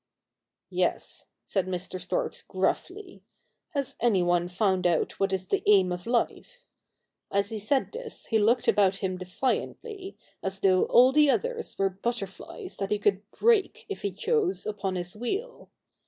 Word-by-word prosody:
' - - -61 0.3
Yes,' - - -1 0.2
said 190 -2 -1
Mr. 185 0 -4
Storks - - -2
gruffly, 370 0 -3 0.3
' - - -50
has 280 -2 -1
any 210 -7 +3
one 175 0 +2
found 185 -1 +1
out 170 -2 0
what 195 0 +1
is 190 -1 -2
the - - +1
aim 195 -3 +5
of 180 +2 -5
life? - - -1 0.3
' - - -52 0.3
As 200 +1 +1
he 220 -2 -4
said 260 +6 +1
this 480 +1 -7
he 220 - +2
looked 230 +4 +3
about 200 -2 +4
him 185 -2 -3
defiantly, 375 - -3 0.2
as 190 0 -2
though 185 -1 +4
all 250 +2 +6
the 300 +1 +5
others 465 - -1
were 195 -1 +2
butter 220 +3 -2
flies, 365 - -9
that 195 - -2
he 210 - +1
could 205 0 0
break, 440 - +2
if 405 - -5
he 200 - 0
chose, 395 - 0
upon 200 -3 -2
his 175 +1 -4
wheel. 390 - -4
210 Hz, 170 wpm, -27 LUFS, -, 0.3 s, all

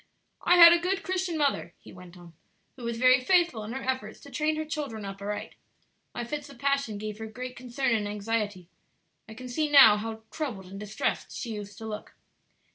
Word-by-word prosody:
"I 355 - +4
had 340 -1 +10
a 345 - +3
good 380 +3 -1
Christian 370 -3 -2
mother," 280 - 0
he - - -15
went 180 0 -13
on, 175 -1 -14 0.4
"who 250 - -11
was 235 0 -2
very 255 +1 +5
faithful 340 - +2
in 215 - -6
her 265 - -5
efforts 260 0 -3
to - - -13
train 310 0 0
her 310 0 -3
children 285 -9 -5
up 195 0 -7
aright. 205 +1 -4 0.6
My 240 - -3
fits 290 +4 -5
of 280 - -13
passion 275 -6 0
gave 215 0 -6
her 220 - -5
great 250 +3 -7
concern 250 0 -1
and 210 -2 0
anxiety. 205 -3 -3 0.6
I 220 - -10
can 250 +2 -8
see 300 +5 -1
now 265 -8 +8
how 220 +1 -6
troubled 245 -12 -4
and 195 - -7
distressed 210 0 -3
she 235 -3 -4
used 205 -1 -8
to 225 - -8
look. 210 -1 -7
240 Hz, 205 wpm, -28 LUFS, 210-290 Hz, 0.6 s, had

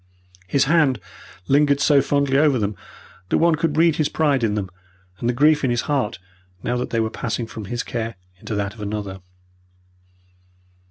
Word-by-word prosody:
His 135 +9 +2
hand 145 -5 +3 0.5
lingered 145 0 +3
so 145 -1 +4
fondly 140 0 +1
over 145 -2 +4
them, 105 -2 -1 0.5
that - - +2
one 170 0 +4
could 155 -1 -1
read 165 -1 +4
his 155 - +1
pride 145 -5 +1
in 105 -2 +1
them 95 -3 -3 0.5
and 120 - -1
the - - +4
grief 150 +4 +3
in 130 - +2
his 120 -1 +1
heart 135 -7 -1 0.5
now 120 - -1
that 125 - -3
they 115 - 0
were 110 0 0
passing 120 -1 -3
from 110 -2 -8
his 120 +5 -3
care 115 -1 -4 0.2
into 105 - -5
that 100 -1 -2
of 110 - -12
another. 100 -2 -4
130 Hz, 180 wpm, -22 LUFS, 110-145 Hz, 0.5 s, so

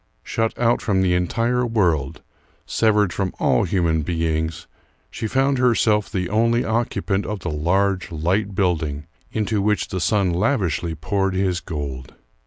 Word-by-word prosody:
Shut 115 0 -1
out 120 0 +2
from 95 -3 +1
the 90 -1 +2
entire 115 +8 +1
world, 90 - 0 0.4
severed 105 -4 +2
from 95 -2 -2
all - - +2
human 85 -3 +1
beings, 80 0 -2 0.5
she 110 - -4
found 135 +3 +1
herself 110 -4 +2
the 90 -2 -1
only 115 +4 +2
occupant 110 -3 -1
of 105 -3 -4
the 85 - -3
large, 95 +5 0
light 95 +6 -1
building, 80 -6 0 0.3
into 105 -1 0
which 105 +1 0
the 95 - -3
sun 100 -2 +2
lavishly 90 - 0
poured 95 +4 -1
his 95 -2 0
gold. 70 -7 -6
95 Hz, 145 wpm, -22 LUFS, 85-110 Hz, 0.5 s, out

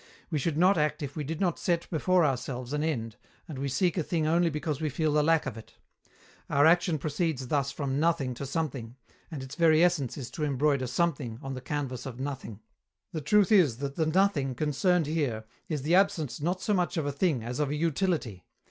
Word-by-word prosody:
We 155 - 0
should 150 +2 -1
not 185 +1 +4
act 150 +1 0
if 140 -1 -6
we 155 - -3
did 155 +3 -4
not 180 -4 0
set 170 -2 0
before 180 +2 +3
ourselves 130 -1 -3
an 150 0 0
end, 115 -9 -2 0.3
and 150 -6 -7
we 140 - -2
seek 175 +7 +1
a - - 0
thing 160 0 -1
only 170 +2 +3
because 150 -1 -3
we 155 - 0
feel 155 +2 0
the 150 - +4
lack 160 +1 +3
of 115 - -5
it. - - -16 0.7
Our 145 0 +4
action 170 0 +4
proceeds 145 -3 -2
thus 140 -2 +1
from 140 -2 -2
"nothing" 160 -5 +1
to 135 +3 -6
"something," 135 -6 -3 0.3
and 150 -6 -6
its 130 +1 -9
very 160 +1 +4
essence 170 -8 +1
is 125 -3 -6
to 155 - -4
embroider 140 -2 +1
"something" 130 -5 -1
on 135 0 -4
the 130 - -6
canvas 135 -2 -4
of 125 -2 -8
"nothing." 130 -6 -5 0.5
The 160 - -4
truth 200 +7 +3
is 165 - +5
that 140 +1 -4
the 160 -2 +1
"nothing" 155 -7 +2
concerned 155 +5 +1
here 140 -8 -1 0.3
is 150 -5 -2
the 160 +4 +1
absence 165 -9 +2
not 180 +4 -1
so 210 - +1
much 180 -2 0
of 155 - 0
a 145 - -1
thing 140 -4 0
as 120 +3 -4
of 150 -2 +1
a 145 - -1
utility. 155 - -1
150 Hz, 220 wpm, -28 LUFS, 135-165 Hz, 0.7 s, is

